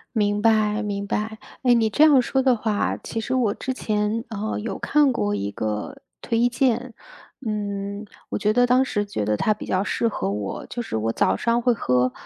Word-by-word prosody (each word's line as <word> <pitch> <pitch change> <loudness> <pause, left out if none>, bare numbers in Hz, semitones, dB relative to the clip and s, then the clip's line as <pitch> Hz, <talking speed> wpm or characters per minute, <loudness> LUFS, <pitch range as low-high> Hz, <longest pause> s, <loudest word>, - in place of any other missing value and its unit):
明 205 -1 +1
白 215 -1 +3
明 200 -1 -3
白。 215 +2 -2 0.3
诶， 245 -2 +5
你 225 -2 +3
这 265 +8 +4
样 295 -4 +7
说 265 +2 0
的 255 -2 +4
话， 215 -2 -1
其 225 - -4
实 250 - -3
我 240 -6 +2
之 260 - -4
前， 215 -1 -1
呃， 215 -1 -3
有 225 - -4
看 290 -3 +3
过 105 - 0
一 100 0 -2
个 105 0 -4 0.2
推 235 +1 +1
荐， 245 0 0 0.5
嗯， 200 0 -3 0.2
我 - - -2
觉 210 +1 +1
得 245 +3 +3
当 250 +2 +4
时 205 -6 -1
觉 200 - -3
得 105 0 0
它 215 - +2
比 210 - -9
较 185 - 0
适 230 +3 0
合 95 - -3
我。 100 0 -4
就 240 - -4
是 170 - -3
我 110 +1 -1
早 - - +2
上 235 +1 +1
会 245 0 +3
喝 125 - +1
215 Hz, 220 characters per minute, -23 LUFS, 200-240 Hz, 0.5 s, 样